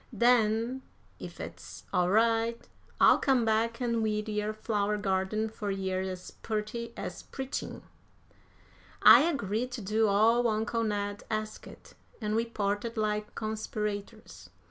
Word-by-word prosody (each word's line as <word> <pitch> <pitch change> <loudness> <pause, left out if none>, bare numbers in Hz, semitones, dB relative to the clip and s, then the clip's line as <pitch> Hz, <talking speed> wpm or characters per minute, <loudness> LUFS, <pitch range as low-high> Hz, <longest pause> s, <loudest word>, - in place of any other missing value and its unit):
Den, 235 +2 +3 0.4
ef - - -9
it's - - -9
all 180 0 +2
right, 230 +2 +2 0.3
I'll - - +6
come 260 -4 +2
back 225 +2 +1
an' 235 -2 0
weed 215 0 -1
yer 210 0 -1
flower 210 -1 -1
garden 195 +2 0
fur 215 -1 -5
yer 190 -1 -1
as 185 -1 -6
purty 220 +2 -3
as - - -5
preachin'." 265 0 -6 1.2
I - - +10
agreed 250 - -1
to 245 - -5
do 215 +3 +1
all 225 +4 +4
uncle 225 +1 0
Ned 205 -1 -2
asked, 215 0 -6 0.3
and 210 -2 -2
we 230 +1 +1
parted 215 +1 -2
like 210 -1 -1
conspirators. 215 0 -5
215 Hz, 130 wpm, -29 LUFS, 210-230 Hz, 1.2 s, I